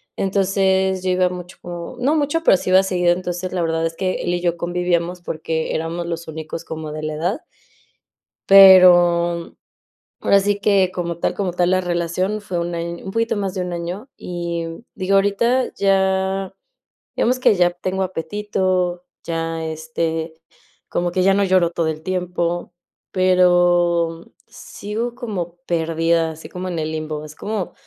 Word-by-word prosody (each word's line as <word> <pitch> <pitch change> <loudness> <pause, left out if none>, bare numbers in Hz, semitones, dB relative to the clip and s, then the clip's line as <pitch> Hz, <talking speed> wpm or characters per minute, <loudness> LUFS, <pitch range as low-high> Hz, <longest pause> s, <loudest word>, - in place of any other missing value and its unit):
Entonces, 190 -1 +1
yo 185 - +1
iba 180 0 +2
mucho 180 0 -8
o 175 -1 -7
no 285 +5 +2
mucho, 295 +2 0
pero 190 - +5
sí 185 - -3
iba 190 +1 +7
seguido, 180 -2 +1
entonces, 180 0 -4
la 180 - -1
verdad 165 0 0
es 165 0 -3
que 185 +1 -1
él 175 - -2
y 175 - -1
yo 175 -1 0
convivíamos 175 0 -1
porque 160 -1 -3
éramos 165 +2 -3
los 170 -1 -5
únicos 160 +1 -6
como 155 -1 -6
de 155 0 -6
la 155 - -3
edad. 180 - -2 1.1
Pero, 175 -3 +7 0.6
ahora 200 - +4
sí 205 +1 0
que 195 -3 +3
como 170 -2 -3
tal - - -1
como 190 -4 -2
tal 180 0 +1
la 185 0 +2
relación 180 +4 -1
fue 185 -4 -3
1 170 0 -3
año, 170 0 -5
un 190 - -5
poquito 230 +2 0
más 195 -2 -2
de 190 - -3
1 180 -1 -4
año 175 +9 -5
y, 170 -1 -4
mm, 165 +6 -8
digo, 195 0 0
ahorita 235 +6 +2
ya 190 0 +1 0.6
digamos 250 +2 +2
que 255 - +4
ya 175 -2 +3
tengo 185 +2 -3
apetito, 185 0 -1 0.2
ya, 165 -1 -3
este, 160 0 -3 0.5
como 175 0 -1
que 185 - +1
ya 195 +1 +4
no 200 +1 +2
lloro 185 -3 +3
todo 170 -1 -1
el 155 0 -4
tiempo, 175 -1 -2 0.4
pero, 175 -2 +3
mm, - - -22 0.2
sigo 225 +4 -6
como 195 -9 -5
perdida, 165 0 +1
así 160 0 -11
como 185 +1 -6
en 175 - -3
el 155 0 -2
limbo, 155 -1 -4
es 155 0 -11
como, 210 -3 -4
180 Hz, 170 wpm, -20 LUFS, 170-190 Hz, 1.1 s, iba